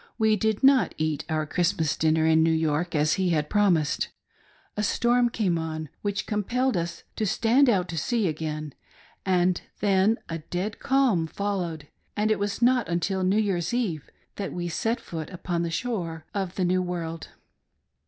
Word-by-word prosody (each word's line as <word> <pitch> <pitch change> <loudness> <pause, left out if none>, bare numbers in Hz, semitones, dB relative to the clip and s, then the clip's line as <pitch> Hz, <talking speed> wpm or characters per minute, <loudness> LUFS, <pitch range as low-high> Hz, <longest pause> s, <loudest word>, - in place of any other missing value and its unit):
We 220 -1 +3
did 220 +2 0
not 270 -1 +5
eat 155 -2 -1
our 155 -1 0
Christmas 160 -2 0
dinner 160 0 +2
in 160 0 +5
New 165 0 +4
York, 160 +1 0
as 150 +1 +3
he 185 - +2
had 150 -3 0
promised, 180 -8 +2 0.7
A 210 - -1
storm 240 +3 +2
came 190 -8 0
on, 155 -1 -4
which 200 -1 -2
compelled 245 +5 0
us 170 0 -3
to 215 - 0
stand 245 +7 +3
out 185 -6 +2
to 165 -1 -2
sea 225 - 0
again, 155 -2 -4 0.5
and 180 -1 +2 0.2
then 200 +2 +3
a 165 0 -4
dead 180 +6 -4
calm 255 -12 +2
followed, 175 -6 -3 0.3
and 215 +1 +2
it 215 - +1
was 205 +3 -2
not 250 -6 +3
until 185 +3 0
New 190 +3 +2
Year's 200 0 0
eve 180 - -2 0.3
that 200 -2 -3
we 175 -1 -3
set 225 +8 -1
foot 160 -2 -6
upon 175 -2 -3
the 170 - -1
shore 170 -5 -3
of 190 -3 -3
the 185 - 0
New 185 +1 +2
World. 170 -2 -4
180 Hz, 175 wpm, -26 LUFS, 160-210 Hz, 0.7 s, not